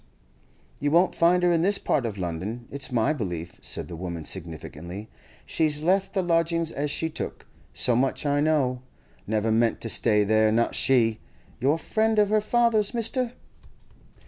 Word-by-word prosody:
'You 145 - 0
won't 170 +5 +3
find 180 +2 +3
her 175 - +4
in 165 -1 +2
this 200 +3 +4
part 135 -10 0
of 105 -3 -6
London, 95 +7 -4
it's 140 -1 -3
my 125 +5 +2
belief,' 90 - -5
said - - -4
the 85 - -7
woman 85 -2 -6
significantly. 85 +4 -6 0.3
'She's 155 -2 -1
left 190 +3 +1
the 190 -2 0
lodgings 165 -1 +1
as 145 +1 -2
she 160 - -1
took—so 125 -5 -4
much 130 +4 0
I 145 0 +2
know. 140 -5 +1 0.5
Never 110 +1 0
meant 115 +1 +2
to 115 - -4
stay 105 -1 +3
there, 110 +1 +3
not 115 +2 +1
she! 115 -4 +2 0.4
You're 140 +5 +2
a - - -4
friend 220 +6 0
of 210 -1 +4
her 215 0 +3
father's, 230 -1 +2
mister? 235 +1 -1
140 Hz, 170 wpm, -25 LUFS, 110-175 Hz, 0.5 s, her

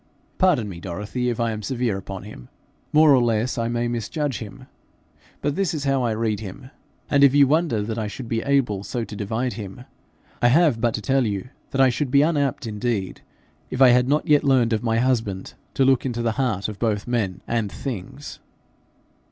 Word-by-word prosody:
Pardon 170 - +3
me, 90 -4 -7
Dorothy, 105 +8 -3
if 120 - -3
I 115 -1 +1
am 110 -1 -5
severe 120 -3 -1
upon 95 0 -7
him. 100 -12 -11 0.4
More 155 -1 +6
or 130 - +5
less 115 +1 0
I 115 - 0
may 120 0 -1
misjudge 120 +4 -2
him, 105 -3 -9 0.8
but 145 0 0
this 190 -4 0
is 145 - -3
how 135 -1 +1
I 120 -2 0
read 110 -2 -1
him; 110 +6 -9 0.4
and 140 -1 +3
if 140 0 +6
you 145 -1 +7
wonder 145 -6 +1
that 110 +2 -3
I 110 - -2
should 120 +4 -7
be 115 0 -1
able 125 -8 +1
so 120 +3 -3
to 110 - -8
divide 110 +5 -2
him, 105 +3 -8 0.6
I 120 - +5
have 140 -3 +3
but 120 -2 +1
to 110 - -5
tell 130 +2 +2
you 100 +3 -4 0.2
that 135 - -3
I 135 - +6
should 130 +2 -2
be 140 +3 +5
unapt 145 -3 0
indeed 105 -3 -3 0.5
if 130 - -4
I 130 -2 +8
had 125 +1 +4
not 150 +2 +1
yet 150 -1 +4
learned 130 -5 +3
of 110 - 0
my 115 -1 0
husband 115 -6 -1 0.2
to 135 - +3
look 130 -2 +3
into 120 -3 -2
the 115 - +1
heart 110 -6 -1
of 105 -2 -7
both 105 -3 0
men 110 -7 -2
and 115 -4 -1
things.' 135 +3 -7
120 Hz, 210 wpm, -23 LUFS, 110-135 Hz, 0.8 s, I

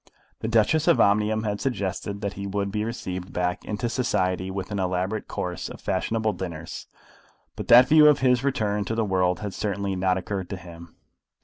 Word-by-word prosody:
The - - -3
Duchess 115 +9 +2
of 170 - +5
Omnium 105 +2 +3
had 105 -1 -2
suggested 100 -4 -3
that 100 0 -3
he 100 0 -6
would 100 0 -2
be 105 +1 -1
received 95 -5 -5
back 90 0 -2
into 105 +3 -3
society 95 -7 0
with 95 +1 -5
an 100 - -2
elaborate 95 +3 -2
course 90 -1 -4
of - - -10
fashionable 110 +4 -1
dinners; 85 -3 -7 0.7
but - - -6
that 125 +2 +8
view 155 +1 +7
of 150 - +6
his 125 -1 +3
return 105 -7 0
to 110 - -2
the 115 -1 +1
world 90 -2 +1
had 100 -2 -4
certainly 100 -1 -2
not 95 0 +1
occurred 95 -1 -4
to 100 - -4
him. 85 -2 -12
100 Hz, 190 wpm, -25 LUFS, 95-110 Hz, 0.7 s, that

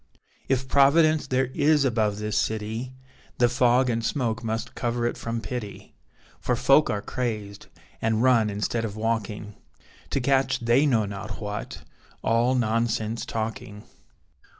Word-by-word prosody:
If 130 -1 0
Providence 155 +3 +4
there 130 0 0
is 150 -1 +3
above 110 -5 +1
this 105 0 -3
city, 110 +4 -2 0.4
The 120 - +4
fog 125 +1 +3
and 115 -1 -1
smoke 120 -4 -1
must 115 0 -3
cover 120 -1 -2
it 120 - -1
from 115 0 -4
pity, 115 -4 -7 0.5
For 125 - 0
folk 135 +5 +4
are 105 -1 -2
crazed, 105 -5 -4 0.3
and 110 +1 +1
run 120 -4 +4
instead 105 +3 -2
of 105 -2 -4
walking, 110 -2 -3 0.6
To - - 0
catch 135 +1 +1
they 120 +5 +3
know 115 -6 +2
not 100 0 -6
what 105 0 -6 0.4
all 120 +3 +2
nonsense 115 -1 -1
talking. 110 -2 -5
115 Hz, 140 wpm, -25 LUFS, 110-130 Hz, 0.6 s, Providence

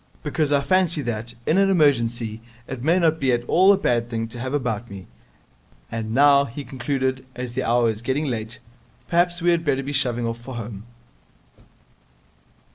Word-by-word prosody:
Because 150 -1 0
I 140 -1 +3
fancy 175 -2 +2
that, 120 0 -4
in 175 - +3
an 195 0 +4
emergency, 120 - +1 0.3
it 130 -2 -6
may 165 +7 +3
not 160 -3 +2
be 135 -2 +2
at 120 0 0
all 185 +10 +5
a 200 - +4
bad 120 -9 0
thing 115 -1 -3
to 120 - -9
have 130 +1 -4
about 120 -4 -2
me. 95 -2 -9 0.9
And 110 -1 -4
now,' 140 +2 +5
he 140 +3 -7
concluded, 130 0 -2
'as 125 -1 -5
the 130 - -1
hour 120 0 +2
is 110 -1 -2
getting 135 +5 -1
late, 115 -4 -3 0.5
perhaps 175 0 +1
we 175 - +4
had 170 -1 +1
better 135 -3 0
be 145 +2 -5
shoving 125 -4 +1
off 115 0 -3
for 125 +2 -9
home.' 110 -3 -7
130 Hz, 185 wpm, -23 LUFS, 115-150 Hz, 0.9 s, all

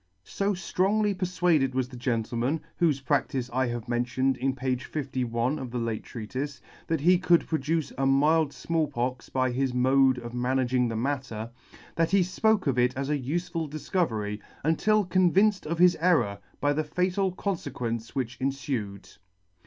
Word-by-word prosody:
So 200 - -1
fcrongly 200 +3 +1
perfuaded 175 -7 +1
was 130 -1 0
the 130 - -10
gentleman, 120 +4 -1 0.2
whofe 145 -5 +2
practice 135 -3 0
I 130 0 +1
have 120 -2 -4
mentioned 125 +2 0
in 130 +1 -1
page 125 -1 -2
51 130 -1 -2
of 130 -2 -5
the 125 - -4
late 115 -2 -2
Treatife, 130 +4 -5 0.3
that 160 -3 0
he 180 +3 +5
could 175 -2 +3
produce 160 0 -1
a 135 - +2
mild 150 +2 +3
Small 165 0 -1
Pox 125 -2 -3
by 130 -1 +1
his 130 0 -1
mode 130 +1 +4
of 120 -1 -7
managing 125 0 +1
the 115 - -3
matter, 120 -3 -3 0.4
that 165 0 +2
he 195 -1 +4
fpoke 200 +3 +1
of 130 -4 +1
it 125 +2 +2
as 140 +2 -2
a 150 - +1
ufeful 165 +3 -3
difcovery, 135 - -2 0.2
until 205 +7 +2
convinced 185 +2 +3
of 165 +2 -2
his 180 +1 +6
error 155 - +2 0.2
by 145 0 +2
the 155 +2 0
fatal 185 +4 0
confequence 125 - -4
which 130 -2 -3
enfued. 130 -7 -3
135 Hz, 160 wpm, -27 LUFS, 125-165 Hz, 0.4 s, his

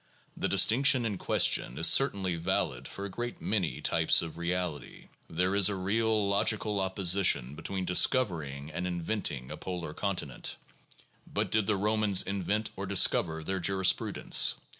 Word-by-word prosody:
The - - -1
distinction 130 +1 +3
in 100 -5 -3
question 60 - +1
is 80 - +1
certainly 95 -5 +3
valid 85 0 -2
for 100 - -7
a - - -5
great 120 +4 -5
many 95 -7 -2
types - - +3
of 80 - -7
reality. 85 -2 -4 0.2
There 90 +3 0
is 100 -1 +4
a 100 - -2
real 105 +2 0
logical 100 +1 0
opposition 95 -8 +1
between 95 +4 -4
discover 90 0 +2
ing 70 +1 -8
and 90 +3 -3
inventing 85 - -3
a - - -6
polar 90 -4 -6
continent. 90 -8 -3 0.8
But - - -2
did 110 -2 +1
the 105 -2 +1
Romans 105 -1 +2
invent 100 +3 -2
or 100 0 -5
discover 85 -4 +2
their 95 +3 -2
jurisprudence? 95 +1 +1
95 Hz, 150 wpm, -29 LUFS, 85-105 Hz, 0.8 s, is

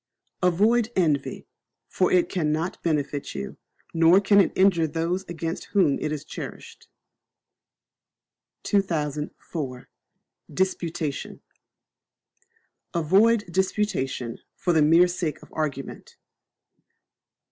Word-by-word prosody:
Avoid 215 +6 +3
Envy; 155 -7 0 0.4
for 185 - +1
it 180 -1 +4
cannot 160 -1 -2
benefit 145 -3 -2
you, 65 -1 -6 0.4
nor 165 +3 +6
can 200 0 +5
it - - +1
injure 185 -4 +4
those 165 +4 -2
against 165 -1 -5
whom 175 -8 +3
it 150 - -2
is 155 -1 -4
cherished. - - -9 1.8
2004. 150 - -2 0.6
Disputation. 170 -5 -2 1.5
Avoid 205 +7 +4
Disputation 185 - -1 0.2
for 175 - 0
the 160 - +4
mere 165 +4 +6
sake 175 -3 -3
of - - -17
argument. 140 -3 -5
165 Hz, 90 wpm, -25 LUFS, 150-190 Hz, 1.8 s, nor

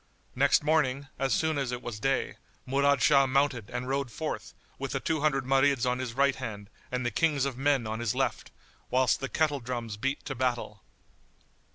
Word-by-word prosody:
Next 140 +2 +4
morning, 145 -3 +1
as 135 -1 0
soon 160 -2 +1
as 135 -3 -2
it 125 0 -5
was 110 -3 -5
day, 135 +3 0 0.3
Murad 140 +1 +2
Shah 140 -3 +5
mounted 130 -5 +1
and 125 0 -4
rode 135 0 -1
forth, - - -5 0.2
with - - -4
the - - 0
two 160 -2 -1
hundred 135 -4 +1
Marids 135 -1 +3
on 125 0 0
his 125 -2 -4
right 140 +1 +3
hand 105 -5 -7 0.2
and 125 0 -2
the 120 - 0
Kings 145 +1 +1
of 135 -3 -2
men 135 -2 +1
on 110 +1 -3
his 120 0 -1
left, 130 -2 -1 0.4
whilst 130 -1 +2
the 135 - -4
kettle 155 -3 +1
drums 120 -3 -5
beat 135 +5 -2
to 135 - -3
battle. 120 -5 -2
135 Hz, 195 wpm, -29 LUFS, 120-140 Hz, 0.4 s, Shah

